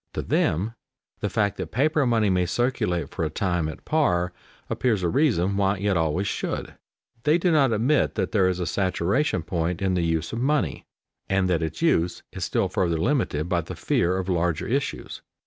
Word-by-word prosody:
To -, -, -3 dB
them 100 Hz, +9 st, 0 dB, 0.5 s
the 105 Hz, -, -1 dB
fact 105 Hz, -2 st, 0 dB
that 95 Hz, -4 st, -4 dB
paper 145 Hz, +2 st, +2 dB
money 110 Hz, -4 st, +2 dB
may 90 Hz, -1 st, +1 dB
circulate 90 Hz, -, 0 dB
for -, -, -3 dB
a 80 Hz, -, 0 dB
time 90 Hz, -1 st, -1 dB
at 80 Hz, -, -10 dB
par 90 Hz, -, +1 dB, 0.3 s
appears 110 Hz, -7 st, 0 dB
a 85 Hz, -, +2 dB
reason 100 Hz, -, +2 dB
why 100 Hz, 0 st, +2 dB
it 100 Hz, 0 st, 0 dB
always 80 Hz, +3 st, 0 dB
should. -, -, -3 dB, 0.5 s
They 150 Hz, +6 st, +3 dB
do 175 Hz, 0 st, +1 dB
not 140 Hz, -6 st, +4 dB
admit 120 Hz, +7 st, +2 dB
that -, -, -1 dB
there 95 Hz, -4 st, +3 dB
is 90 Hz, -1 st, -2 dB
a 90 Hz, -, -1 dB
saturation 95 Hz, -, 0 dB
point 85 Hz, 0 st, -2 dB
in 95 Hz, -1 st, 0 dB
the 90 Hz, -, +1 dB
use 80 Hz, -1 st, -1 dB
of 115 Hz, -, -2 dB
money, 145 Hz, +4 st, 0 dB, 0.4 s
and 95 Hz, -1 st, +2 dB
that 85 Hz, -2 st, +1 dB
its 80 Hz, -, -3 dB
use 90 Hz, -, +1 dB
is -, -, -5 dB
still -, -, +1 dB
further 85 Hz, -3 st, 0 dB
limited 85 Hz, -, 0 dB
by 90 Hz, -1 st, +1 dB
the -, -, -8 dB
fear 90 Hz, +2 st, +1 dB
of 95 Hz, -1 st, -3 dB
larger 85 Hz, -3 st, 0 dB
issues. 135 Hz, +4 st, -3 dB
95 Hz, 195 wpm, -25 LUFS, 85-120 Hz, 0.5 s, not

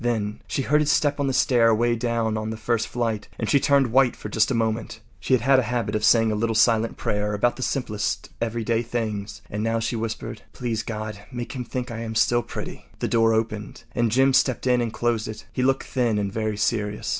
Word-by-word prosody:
Then 110 Hz, -3 st, -1 dB
she 135 Hz, -, -1 dB
heard 150 Hz, +3 st, +3 dB
his 150 Hz, 0 st, +2 dB
step 145 Hz, -1 st, +2 dB
on 140 Hz, -, +1 dB
the -, -, +1 dB
stair 120 Hz, -2 st, +3 dB
away 120 Hz, +1 st, +3 dB
down 115 Hz, -2 st, -1 dB
on 110 Hz, 0 st, -3 dB
the 110 Hz, -, -4 dB
first 110 Hz, 0 st, 0 dB
flight, 115 Hz, -3 st, -2 dB
and -, -, -2 dB
she 140 Hz, -, +4 dB
turned 135 Hz, -3 st, +3 dB
white 130 Hz, 0 st, +4 dB
for 105 Hz, -, -8 dB
just 110 Hz, +1 st, +2 dB
a 130 Hz, -, 0 dB
moment. 115 Hz, 0 st, -1 dB, 0.2 s
She 130 Hz, -, +2 dB
had 130 Hz, +3 st, +4 dB
a -, -, +3 dB
habit 120 Hz, -1 st, -2 dB
of 105 Hz, -, -1 dB
saying 115 Hz, 0 st, +5 dB
a -, -, 0 dB
little 115 Hz, +1 st, 0 dB
silent 115 Hz, 0 st, +3 dB
prayer 105 Hz, 0 st, -1 dB
about 120 Hz, +4 st, +1 dB
the -, -, -8 dB
simplest 110 Hz, -6 st, -2 dB
everyday 115 Hz, 0 st, 0 dB
things, 110 Hz, -3 st, -4 dB
and 105 Hz, -, -4 dB
now 115 Hz, +1 st, 0 dB
she 115 Hz, +2 st, -2 dB
whispered: 110 Hz, -1 st, -4 dB
“Please 115 Hz, -3 st, -2 dB
God, 110 Hz, -2 st, -5 dB
make 120 Hz, -1 st, -5 dB
him 125 Hz, -2 st, -4 dB
think 125 Hz, -1 st, -4 dB
I 115 Hz, -, -5 dB
am 110 Hz, -1 st, -5 dB
still 120 Hz, +2 st, +3 dB
pretty.” -, -, -7 dB
The -, -, -2 dB
door 115 Hz, -1 st, +3 dB
opened 110 Hz, -1 st, -3 dB
and 120 Hz, -2 st, +1 dB
Jim 135 Hz, +3 st, +4 dB
stepped 130 Hz, -1 st, +2 dB
in 125 Hz, -1 st, +3 dB
and 115 Hz, -2 st, -1 dB
closed 115 Hz, -1 st, -1 dB
it. 110 Hz, -, -8 dB
He -, -, -1 dB
looked 135 Hz, +1 st, +2 dB
thin 120 Hz, -5 st, 0 dB
and 100 Hz, -1 st, -2 dB
very 110 Hz, -1 st, -2 dB
serious. 105 Hz, -1 st, -1 dB
115 Hz, 230 wpm, -24 LUFS, 110-125 Hz, 0.2 s, saying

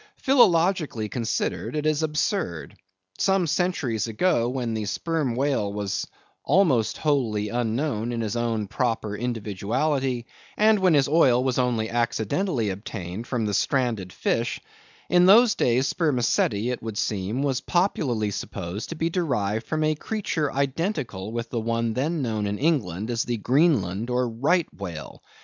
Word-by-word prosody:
Philologically 175 Hz, -, +3 dB
considered, 115 Hz, +5 st, -2 dB
it 150 Hz, 0 st, -2 dB
is 155 Hz, 0 st, +2 dB
absurd. 150 Hz, -, -2 dB, 0.4 s
Some 190 Hz, -2 st, +2 dB
centuries 145 Hz, -, 0 dB
ago, 120 Hz, +1 st, +1 dB
when 125 Hz, -3 st, -2 dB
the 110 Hz, -1 st, -2 dB
Sperm 150 Hz, +1 st, -1 dB
whale 130 Hz, -6 st, 0 dB
was 100 Hz, -2 st, -3 dB, 0.4 s
almost 130 Hz, -, +2 dB
wholly 115 Hz, -9 st, 0 dB
unknown 120 Hz, 0 st, -1 dB
in 115 Hz, -1 st, -2 dB
his 110 Hz, 0 st, -2 dB
own 115 Hz, -2 st, -1 dB
proper 115 Hz, -2 st, -2 dB
individuality, 120 Hz, +4 st, -1 dB, 0.3 s
and 215 Hz, 0 st, +4 dB
when 185 Hz, -4 st, +4 dB
his 140 Hz, -2 st, +3 dB
oil 135 Hz, -5 st, +4 dB
was 130 Hz, -1 st, 0 dB
only 120 Hz, -3 st, +1 dB
accidentally 120 Hz, -, 0 dB
obtained 95 Hz, +1 st, -6 dB
from 120 Hz, -4 st, -1 dB
the 105 Hz, -, -1 dB
stranded 115 Hz, -6 st, 0 dB
fish; 115 Hz, +5 st, -1 dB, 0.5 s
in 180 Hz, 0 st, +5 dB
those 225 Hz, +3 st, +7 dB
days 125 Hz, +3 st, +2 dB
spermaceti, 125 Hz, -, +1 dB
it 125 Hz, -, -4 dB
would 110 Hz, -2 st, -5 dB
seem, 105 Hz, +7 st, -1 dB
was 135 Hz, -2 st, 0 dB
popularly 130 Hz, -, 0 dB
supposed 95 Hz, 0 st, -5 dB
to 165 Hz, -, -5 dB
be 165 Hz, +1 st, -1 dB
derived 110 Hz, -, -1 dB
from 155 Hz, 0 st, -1 dB
a 155 Hz, 0 st, +2 dB
creature 155 Hz, -4 st, -2 dB
identical 140 Hz, -, -2 dB
with 115 Hz, 0 st, -4 dB
the 115 Hz, -, -1 dB
one 115 Hz, 0 st, -1 dB
then 150 Hz, +5 st, -1 dB
known 110 Hz, -4 st, -1 dB
in 100 Hz, 0 st, -2 dB
England 120 Hz, -, 0 dB
as 115 Hz, -1 st, 0 dB
the 120 Hz, 0 st, -2 dB
Greenland 115 Hz, -, +1 dB
or 125 Hz, 0 st, +1 dB
Right 140 Hz, +9 st, +1 dB
Whale. 85 Hz, -7 st, -7 dB
120 Hz, 150 wpm, -25 LUFS, 110-155 Hz, 0.5 s, those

